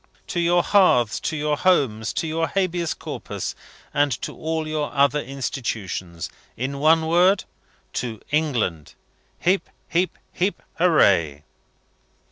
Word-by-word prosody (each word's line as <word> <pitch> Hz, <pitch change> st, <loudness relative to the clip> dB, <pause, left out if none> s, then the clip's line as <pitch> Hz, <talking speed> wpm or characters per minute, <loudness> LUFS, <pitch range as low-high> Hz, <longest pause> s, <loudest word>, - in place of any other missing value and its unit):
to 175 Hz, -, -3 dB
your 175 Hz, +1 st, +3 dB
Hearths, 125 Hz, -, +4 dB
to 160 Hz, -, -2 dB
your 150 Hz, 0 st, +1 dB
Homes, 135 Hz, -, +2 dB
to 165 Hz, -, -1 dB
your 165 Hz, +1 st, 0 dB
Habeas 175 Hz, -3 st, -1 dB
Corpus, -, -, -5 dB, 0.4 s
and 145 Hz, 0 st, +2 dB
to -, -, -4 dB
all 160 Hz, 0 st, -2 dB
your 155 Hz, -1 st, -2 dB
other 140 Hz, +1 st, +3 dB
institutions! 110 Hz, -, -4 dB, 0.3 s
In 135 Hz, +3 st, -3 dB
one 160 Hz, +2 st, +4 dB
word 180 Hz, +4 st, +4 dB, 0.5 s
to 115 Hz, -4 st, -3 dB
England! 125 Hz, -, 0 dB, 0.5 s
Heep 185 Hz, +3 st, +1 dB, 0.2 s
heep 180 Hz, 0 st, 0 dB, 0.2 s
heep! 190 Hz, +3 st, -1 dB, 0.2 s
hooray! 95 Hz, -, +4 dB
150 Hz, 120 wpm, -23 LUFS, 120-170 Hz, 0.5 s, Hearths